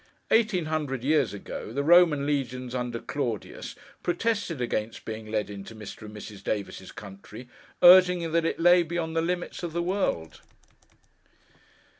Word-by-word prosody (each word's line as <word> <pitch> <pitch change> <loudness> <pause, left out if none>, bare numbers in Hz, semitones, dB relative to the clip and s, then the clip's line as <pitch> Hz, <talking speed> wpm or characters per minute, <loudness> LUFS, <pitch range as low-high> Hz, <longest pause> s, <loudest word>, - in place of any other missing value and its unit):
Eighteen 215 -7 +3
hundred 150 -5 -2
years 145 -4 +2
ago, 100 +1 -7
the 140 +4 -1
Roman 165 -3 +5
legions 130 -3 -2
under 125 -2 -2
Claudius, 120 -7 -4 0.3
protested 180 - -1
against 115 -2 -3
being 110 -1 -6
led 110 -1 -1
into 100 +2 -9
Mr. 110 0 -9
and 105 - -11
Mrs. 100 -1 -10
Davis's 100 -2 -4
country, 105 +4 -11 0.4
urging 180 -2 +7
that 165 0 +2
it 165 - -1
lay 175 +1 +6
beyond 165 -1 -3
the 165 - +2
limits 175 +1 -3
of 170 -3 -5
the 170 0 -1
world. 130 - -2
140 Hz, 145 wpm, -27 LUFS, 110-170 Hz, 0.4 s, urging